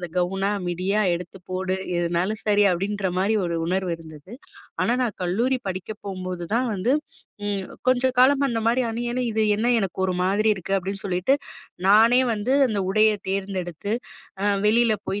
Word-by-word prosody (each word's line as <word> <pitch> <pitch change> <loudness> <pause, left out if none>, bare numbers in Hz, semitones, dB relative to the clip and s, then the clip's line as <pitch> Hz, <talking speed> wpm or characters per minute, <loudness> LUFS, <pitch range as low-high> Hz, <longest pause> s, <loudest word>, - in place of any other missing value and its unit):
அந்த 175 -2 -6
கவுனா, 195 +3 0 0.2
மிடியா, 185 +4 0 0.2
எடுத்து 180 +2 -10
போடு! 185 0 -1 0.2
எதுனாலும் 175 +6 -1
சரி." 205 -1 +4
அப்பிடின்றமாரி 195 +2 0
ஒரு 170 - -2
உணர்வு 185 -1 0
இருந்தது. 160 +4 -13 0.5
ஆனா, 235 - +2
நான் 225 - -4
கல்லூரி 235 +9 +1
படிக்க 190 - -1 0.3
போம்போது 185 -2 -5
தான் 250 +1 +1
வந்து 200 +7 +1 0.5
ம். 200 -2 -2 0.2
கொஞ்சம் 255 0 +3
காலம் 275 +2 +5
அந்த 235 -4 -1
மாரி 240 +3 +3
அணியணிய, 240 +2 -2
"இது 220 0 0
என்ன 235 +3 +1
எனக்கு 195 -3 -3
ஒரு 185 - 0
மாதிரி 200 +4 +2
இருக்கு?" 190 0 -6
அப்பிடின்னு 195 +1 -4
சொல்லிட்டு. 185 +7 +2 0.5
நானே 225 +5 +6
வந்து 215 +4 -1 0.2
அந்த 215 -3 -1
உடைய 215 +2 +4 0.2
தேர்ந்தெடுத்து 190 -1 -3 0.5
அ - - 0 0.2
வெளியில 225 +1 +4
போய் 195 +2 -2
200 Hz, 160 wpm, -24 LUFS, 185-225 Hz, 0.5 s, நானே